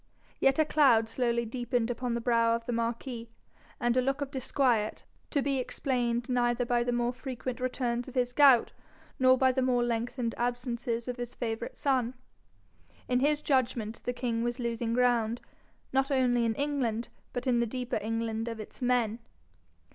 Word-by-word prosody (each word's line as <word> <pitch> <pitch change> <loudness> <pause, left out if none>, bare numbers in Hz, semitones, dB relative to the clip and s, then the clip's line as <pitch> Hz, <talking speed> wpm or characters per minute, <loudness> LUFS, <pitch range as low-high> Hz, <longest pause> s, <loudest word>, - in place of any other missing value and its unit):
Yet 270 0 +3
a 315 - +4
cloud 265 -8 +4
slowly 235 0 0
deepened 240 0 -1
upon 245 0 -2
the 235 - -2
brow 230 -1 +3
of 230 0 -5
the 245 - -2
marquis, 235 0 -3 0.5
and 240 0 +1
a 255 - +4
look 270 +2 0
of 285 -1 -3
disquiet, 255 -5 0 0.3
to 285 -3 0
be 275 -1 0
explained 245 -2 -1
neither 245 -1 +1
by 240 0 +2
the 245 - -1
more 240 0 0
frequent 255 -1 -5
returns 245 -1 -1
of 260 - -10
his 245 -1 +1
gout, 270 -4 +6 0.5
nor 255 0 +6
by 260 0 +4
the 260 +1 0
more 250 -1 +2
lengthened 235 0 -1
absences 240 -1 -2
of 250 0 -3
his 245 -1 -6
favourite 230 -1 -4
son. 260 -3 0 0.9
In 250 0 +2
his 295 +2 +1
judgment 240 -5 0
the 245 - -1
king 240 -2 -2
was 240 +2 -2
losing 235 -1 -2
ground, 240 -2 +2 0.5
not 270 +1 +2
only 250 -3 +2
in 225 -1 0
England 260 -6 -1 0.2
but 245 +1 -4
in 245 -2 +2
the 235 - +1
deeper 250 0 -3
England 225 +1 -2
of 230 -1 -4
its 215 - -10
men. 245 -3 +1
245 Hz, 175 wpm, -30 LUFS, 235-255 Hz, 0.9 s, gout